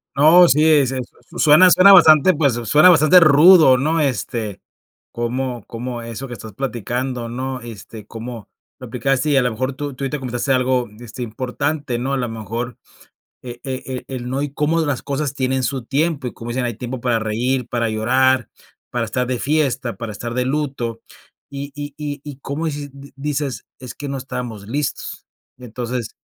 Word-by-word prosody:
No, 165 +5 +7
sí, 150 +1 +3
es 145 -5 +4
su 130 -1 -3 0.3
su - - -10
suena 165 +4 +7
suena 190 +3 +7
bastante, 160 -2 +7
pues, 145 -4 +2
suena 135 +9 +5
bastante 165 +1 +7
rudo, 155 -2 +7
¿no?, 155 +4 +1
este, 120 -7 -2 0.5
cómo 120 0 -3
cómo 120 0 -6
eso 115 +3 -7
que 125 - -8
estás 110 -1 -10
platicando, 125 +1 -3
¿no?, 130 +2 -4
este, 110 -2 -10
cómo 115 0 -8 0.3
lo 130 - -9
aplicaste 130 +4 0
y, 140 - +3
a - - +5
la 125 - +1
mejor, 130 +4 -3
tú 145 0 -6
tú 140 - -7
ahorita 140 +2 -2
comentaste 125 0 -3
algo, 130 -1 +1
este, 120 +1 -7
importante, 130 +4 -3
¿no?, 130 +3 -2
a - - +1
la 125 -2 -2
mejor, 115 +2 -5 0.6
e 120 -1 -9
e 130 -1 -5
e - - -7
el 125 -1 -5
no 135 +2 -2
y 145 -1 -3
cómo 155 +3 +1
las 145 -5 -1
cosas 140 0 -2
tienen 130 -1 -1
su 130 -2 -2
tiempo, 145 0 -1
y - - -6
como 115 - -9
dicen: 125 +1 -1
"Hay 120 - -2
tiempo 125 +3 -6
para 120 -1 0
reír, 120 +3 -1
para 115 -1 -1
llorar, 125 +4 +2 0.4
para 120 -1 -2
estar 125 +3 -2
de 125 -1 -2
fiesta, 135 -5 0
para 115 -2 -6
estar 115 +3 -6
de 125 +1 0
luto", 130 -5 -2 0.5
y 140 0 -7
y 145 0 -6
y 145 -1 -5
y 145 -3 -8
como 140 +4 -4
dices 145 -2 -4
di 140 0 -13
dices: 140 -1 -3
"Es 125 -2 -8
que 145 -1 -7
no 140 - -3
estábamos 125 -5 -6
listos". 140 +4 -4 0.3
Entonces, 125 -1 -5
130 Hz, 190 wpm, -20 LUFS, 120-145 Hz, 0.6 s, No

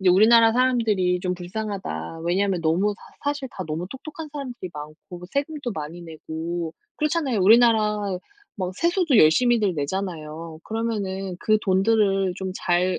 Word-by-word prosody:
이제 185 -1 +4
우리나라 225 +4 +6
사람들이 220 -8 +2
좀 180 0 -1
불쌍하다. 180 - -5
왜냐하면 185 +1 +1
너무 185 +6 +2
사 285 - -5
사실 285 -3 -5
다 185 - -6
너무 160 +3 -3
똑똑한 310 +3 -8
사람들이 250 - -6
많고 155 +4 -9
세금도 285 -2 -2
많이 160 +2 -6
내고. 165 +1 -5 0.2
그렇잖아요. 300 -6 0
우리나라 215 0 +5 0.6
막 185 0 -2
세수도 340 - +2
열심히들 210 +4 +4
내잖아요. 160 0 -4
그러면은 200 -5 -3
그 215 0 +3
돈들을 195 -1 +2
좀 190 -1 -4
잘 180 +1 +2
195 Hz, 340 characters per minute, -24 LUFS, 175-230 Hz, 0.6 s, 우리나라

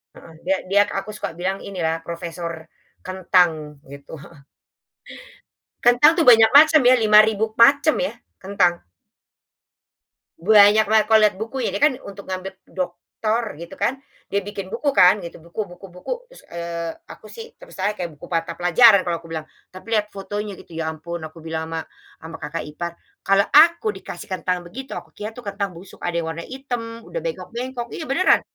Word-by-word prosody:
heeh, 165 - -14
dia 190 - +2
dia 200 +1 +5 0.2
aku 215 +2 -8
suka 185 -5 -6
bilang 190 +3 -2
ini 185 -4 -6
ya 160 0 0
profesor 170 0 -5 0.5
kentang 175 -5 +1
gitu 140 +2 -10
heeh. 140 -1 -17 1.4
Kentang 245 +6 +6
itu 330 - +1
banyak 225 -4 +7
macam 310 +2 +8
ya, 250 - +7
5000 215 -1 +5
macam 280 +6 +5
ya 275 - -1 0.2
kentang. 180 -3 0 1.5
Banyak 210 +3 +6
banget 215 -1 +4
kalau 220 0 +6
lihat 205 - -5
buku 225 +6 -5
ya - - 0
kan 265 +2 +3
untuk 200 0 -9
mengambil 190 0 -5
doktor 210 +5 -3
gitu 170 - -9
kan 265 +2 -1 0.3
dia 200 - +1
bikin 200 -1 -7
buku 265 +6 -1
kan 185 +3 +6
gitu 170 -2 -9
buku 170 +6 -5
buku 195 - -13
buku 180 - -8 0.2
terus, - - -15
eee, 170 -1 -5 0.2
aku - - -13
sih 460 0 -10
terus - - -14
kayak 190 -3 -2
buku 150 - -12
mata 165 0 -2
pelajaran 200 +3 +6
kalau 170 -1 -2
aku 165 - -15
bilang, 160 -1 -5 0.3
tapi 185 +5 -11
lihat 210 -1 +2
fotonya 205 +1 -6
gitu 175 - -16
ya 160 - -2
ampun 170 +2 -6
aku 155 +1 -15
bilang 160 0 -4
ama 165 -1 -4 0.4
ama 160 0 -9
kakak 150 +2 -5
ipar, 170 +3 -6 0.4
"Kalau 195 0 +5
aku 340 +7 +5
dikasih - - -9
kentang 180 -1 -2
begitu 260 +10 -8
aku - - -9
kira 215 +2 -8
itu 245 - -10
kentang 200 -3 -4
busuk." 180 +3 -13
Ada 175 -1 -3
yang 165 -1 -2
warna 165 +1 -7
hitam 240 -4 -6
udah - - -5
bengkok-bengkok 250 - -5
iya 315 - -6
beneran, 310 +8 +4
195 Hz, 175 wpm, -22 LUFS, 170-230 Hz, 1.5 s, macam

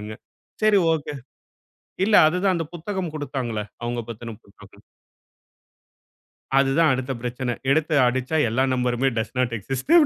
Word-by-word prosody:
அப்டின்னாங்க. 105 +1 -7 0.5
சரி, 215 -2 +5
ஒகே. 150 -2 -3 0.9
இல்ல, 210 0 +3
அது 165 +3 0
தான் 195 -2 +3
அந்த 165 -1 -2
புத்தகம் 180 0 -4
குடுத்தாங்களே. 130 -7 -3 0.2
அவுங்க 120 0 -2
பத்தின 115 0 -7
புத்தகம். 100 - -18 1.8
அதுதான் 140 +4 +3
அடுத்த 130 +1 -2
பிரச்சன 125 0 -3
எடுத்து 155 +2 +2
அடிச்சா 130 +5 0
எல்லா 130 +4 +2
நம்பருமே 125 +1 +1
டஸ் 110 +3 -3
நட் 125 -2 +1
எக்ஸிஸ்ட். 135 - -3
130 Hz, 130 wpm, -23 LUFS, 120-160 Hz, 1.8 s, சரி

